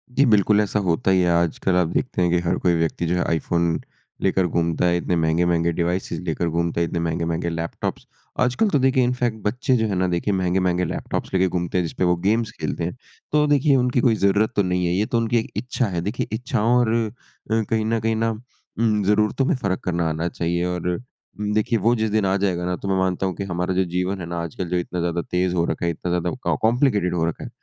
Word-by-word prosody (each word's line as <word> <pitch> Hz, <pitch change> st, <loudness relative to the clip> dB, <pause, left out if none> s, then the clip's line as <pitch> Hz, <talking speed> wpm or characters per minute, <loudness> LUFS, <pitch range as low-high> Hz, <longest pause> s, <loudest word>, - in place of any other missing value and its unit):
जी 140 Hz, -, +5 dB
बिल्कुल 105 Hz, -2 st, +4 dB
ऐसा 105 Hz, 0 st, 0 dB
होता 95 Hz, 0 st, +1 dB
ही 95 Hz, -, +4 dB
है। 90 Hz, -, +2 dB
आजकल 85 Hz, +2 st, +1 dB
आप 90 Hz, -2 st, +3 dB
देखते 125 Hz, -, -1 dB
हैं 90 Hz, -, +3 dB
कि 90 Hz, -, +3 dB
हर 90 Hz, -, +1 dB
कोई 90 Hz, -1 st, +2 dB
व्यक्ति 80 Hz, +1 st, -1 dB
जो 85 Hz, -, 0 dB
है, 90 Hz, -, +1 dB
आईफ़ोन 85 Hz, +1 st, 0 dB, 0.4 s
लेकर 95 Hz, -1 st, +2 dB
घूमता 85 Hz, 0 st, 0 dB
है, 90 Hz, 0 st, +3 dB
इतने 90 Hz, 0 st, -1 dB
महँगे-महँगे 85 Hz, +1 st, +2 dB
डिवाइसेस 85 Hz, +2 st, -2 dB
लेकर 85 Hz, +1 st, -1 dB
घूमता 85 Hz, +1 st, -1 dB
है, 85 Hz, -, +3 dB
इतने 85 Hz, -, -3 dB
महँगे-महँगे 85 Hz, 0 st, -1 dB
लैपटॉप्स 85 Hz, 0 st, -4 dB, 0.3 s
आजकल 125 Hz, -, +2 dB
तो 145 Hz, -, +2 dB
देखिए 130 Hz, 0 st, +3 dB
इनफैक्ट 120 Hz, -2 st, 0 dB
बच्चे 125 Hz, +5 st, +1 dB
जो 110 Hz, -1 st, +1 dB
हैं 100 Hz, -, -1 dB
ना, 90 Hz, 0 st, +1 dB
देखिए 90 Hz, +3 st, 0 dB
महँगे-महँगे 90 Hz, -1 st, +1 dB
लैपटॉप्स -, -, -4 dB
लेके 95 Hz, 0 st, +3 dB
घूमते 90 Hz, 0 st, -2 dB
हैं, 90 Hz, -, +2 dB
जिसपे 80 Hz, -, -3 dB
वो 90 Hz, 0 st, +3 dB
गेम्स 110 Hz, +6 st, 0 dB
खेलते -, -, -3 dB
हैं। 90 Hz, -, -3 dB, 0.4 s
तो 150 Hz, 0 st, +3 dB
देखिए 145 Hz, 0 st, +3 dB
उनकी 125 Hz, -1 st, +2 dB
कोई 115 Hz, -3 st, +3 dB
ज़रूरत 100 Hz, +1 st, +2 dB
तो 100 Hz, -, +3 dB
नहीं 90 Hz, -1 st, 0 dB
है। 85 Hz, -, +1 dB
ये 100 Hz, +4 st, +1 dB
तो 115 Hz, -, -1 dB
उनकी 115 Hz, +1 st, +1 dB
एक 110 Hz, -, -6 dB
इच्छा 125 Hz, 0 st, -1 dB
है। 85 Hz, -3 st, -2 dB
देखिए 105 Hz, +7 st, -3 dB
इच्छाओं 120 Hz, -1 st, +1 dB
और 120 Hz, -2 st, +3 dB, 0.6 s
अ -, -, +3 dB
अ, 115 Hz, -, +1 dB
कहीं 110 Hz, -1 st, +1 dB
न 115 Hz, 0 st, +1 dB
कहीं 115 Hz, +1 st, 0 dB
ना 115 Hz, +1 st, +1 dB, 0.5 s
उम्, 110 Hz, -3 st, +2 dB
ज़रूरतों 105 Hz, +6 st, +2 dB
में 160 Hz, -, +2 dB
फ़र्क़ 100 Hz, -7 st, -2 dB
करना 85 Hz, -2 st, 0 dB
आना 80 Hz, +2 st, -2 dB
चाहिए। 85 Hz, +1 st, -1 dB
और 90 Hz, -1 st, -2 dB
अ, 85 Hz, -, -2 dB, 0.6 s
देखिए 110 Hz, +2 st, +1 dB
वो 115 Hz, +5 st, +3 dB
जिस 110 Hz, -1 st, 0 dB
दिन 110 Hz, -2 st, +2 dB
आ 95 Hz, 0 st, +2 dB
जाएगा 90 Hz, -3 st, -1 dB
ना, 90 Hz, 0 st, -1 dB
तो 100 Hz, -, -7 dB
मैं 95 Hz, -1 st, +1 dB
मानता 95 Hz, 0 st, 0 dB
हूँ 95 Hz, -2 st, -2 dB
कि 100 Hz, -, -4 dB
हमारा 90 Hz, 0 st, -2 dB
जो 95 Hz, +1 st, +2 dB
जीवन 95 Hz, +2 st, -1 dB
है -, -, -4 dB
ना, 85 Hz, 0 st, -4 dB
आजकल 85 Hz, +2 st, -5 dB
जो 90 Hz, -, 0 dB
इतना 90 Hz, 0 st, -3 dB
ज़्यादा 85 Hz, 0 st, -1 dB
तेज़ 90 Hz, 0 st, +1 dB
हो 85 Hz, -1 st, +2 dB
रखा 85 Hz, -, -2 dB
है, 85 Hz, -, +1 dB
इतना 85 Hz, +2 st, -4 dB
ज़्यादा 90 Hz, +9 st, -2 dB
कॉम्प्लिकेटेड 110 Hz, -6 st, +2 dB
हो 80 Hz, -1 st, +1 dB
रखा 85 Hz, -, -3 dB
है, -, -, -7 dB
90 Hz, 240 wpm, -22 LUFS, 85-110 Hz, 0.6 s, जी